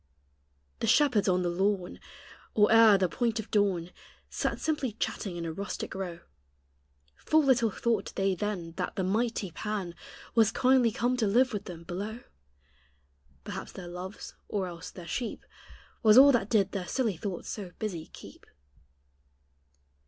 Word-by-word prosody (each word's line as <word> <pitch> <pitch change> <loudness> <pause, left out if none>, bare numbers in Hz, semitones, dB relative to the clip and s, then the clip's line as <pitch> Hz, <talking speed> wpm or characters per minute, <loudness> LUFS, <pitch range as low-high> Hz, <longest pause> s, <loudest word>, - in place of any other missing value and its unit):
The - - -1
shepherds 250 -10 +4
on 180 0 +2
the 175 - 0
lawn, 190 +1 -1 0.6
Or 210 0 +5
e'er 225 -3 +8
the 185 -1 +2
point 230 +4 -1
of 220 - -7
dawn, 190 -5 +1 0.4
Sat - - -2
simply 290 -7 -1
chatting 200 -3 -3
in 170 - -4
a 165 - -3
rustic 200 +4 -5
row; 180 -3 -5 1.0
Full 315 0 +3
little 250 -4 +3
thought 225 +1 -1
they 195 0 +1
then 185 -3 -3
That 180 - -3
the 190 - -1
mighty 215 0 -1
Pan 200 -1 -4 0.4
Was 220 -2 +4
kindly 250 -1 +3
come 245 +3 0
to 225 -4 +1
live 245 +5 +3
with 205 - -4
them 170 -2 -8
below; 205 +7 -5 1.2
Perhaps - - -7
their 180 -2 -8
loves, 180 +3 -8 0.2
or 200 -3 -1
else 175 -1 -7
their 180 - -10
sheep, 235 +6 -4 0.6
Was 215 0 +6
all 280 +2 +10
that 225 -5 +1
did 200 -4 +2
their 185 -3 -4
silly 230 -7 0
thoughts 180 +1 -5
so 200 -4 -5
busy 180 -7 -4
keep. - - -14
205 Hz, 155 wpm, -29 LUFS, 180-230 Hz, 1.2 s, all